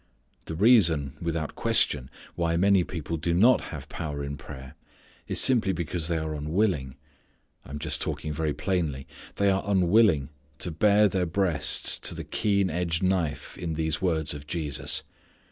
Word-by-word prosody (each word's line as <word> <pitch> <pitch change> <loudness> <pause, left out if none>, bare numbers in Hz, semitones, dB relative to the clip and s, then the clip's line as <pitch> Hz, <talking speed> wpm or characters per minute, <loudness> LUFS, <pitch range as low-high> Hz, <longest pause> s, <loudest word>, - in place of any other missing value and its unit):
The 80 - -6
reason, 85 - +4
without 80 -2 -3
question, 65 -3 +3 0.2
why 85 -1 0
many 95 0 +4
people 85 -1 -5
do 85 +2 -1
not 115 +8 +5
have 75 -2 -8
power 75 -3 -5
in 70 0 -4
prayer 65 -1 -10 0.5
is - - 0
simply 115 -7 +3
because 85 -1 -2
they 85 -1 0
are 80 -1 -3
unwilling 75 - -1 0.7
I - - -14
am 70 - -5
just - - -2
talking 75 0 -3
very 80 0 -1
plainly 80 -5 -2 0.3
they 100 -1 +2
are 95 0 +1
unwilling 95 -6 +3 0.3
to 85 - -2
bare 105 +5 +4
their 95 -2 -1
breasts 80 -4 0
to - - -4
the - - -6
keen 100 -4 0
edged 85 0 -1
knife 90 -5 -1
in 80 -2 -3
these 80 -1 -2
words 80 -5 0
of 75 0 -9
Jesus. 75 -4 -3
85 Hz, 160 wpm, -26 LUFS, 75-95 Hz, 0.7 s, not